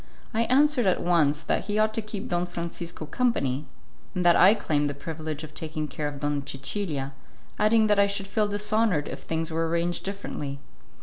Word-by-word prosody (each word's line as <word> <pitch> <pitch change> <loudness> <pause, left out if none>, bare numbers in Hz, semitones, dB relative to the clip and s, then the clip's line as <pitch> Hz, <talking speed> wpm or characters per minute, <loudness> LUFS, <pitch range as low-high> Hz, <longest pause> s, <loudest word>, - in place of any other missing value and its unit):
I 230 +1 +2
answered 270 -2 +4
at 185 - +3
once 160 -4 +2
that - - 0
he 205 0 -1
ought 215 0 +3
to 225 - -1
keep 210 -2 -6
Don 175 0 0
Francisco 170 -1 -5
company, 150 - 0 0.5
and 180 -1 0
that 175 - +7
I 195 +4 +7
claimed 150 -8 0
the 145 - -4
privilege 155 0 -5
of 155 - -9
taking 155 -1 -4
care 150 0 -3
of 145 -1 -7
Donna 145 -1 0
Cecilia, 135 0 -3 0.5
adding 220 +1 +4
that 210 -1 +3
I 200 - +5
should 200 0 -1
feel 210 +2 +1
dishonoured 205 -5 +1
if - - -5
things 160 0 -2
were 165 +1 0
arranged 170 +1 0
differently. 190 -8 -5
175 Hz, 190 wpm, -26 LUFS, 150-210 Hz, 0.5 s, that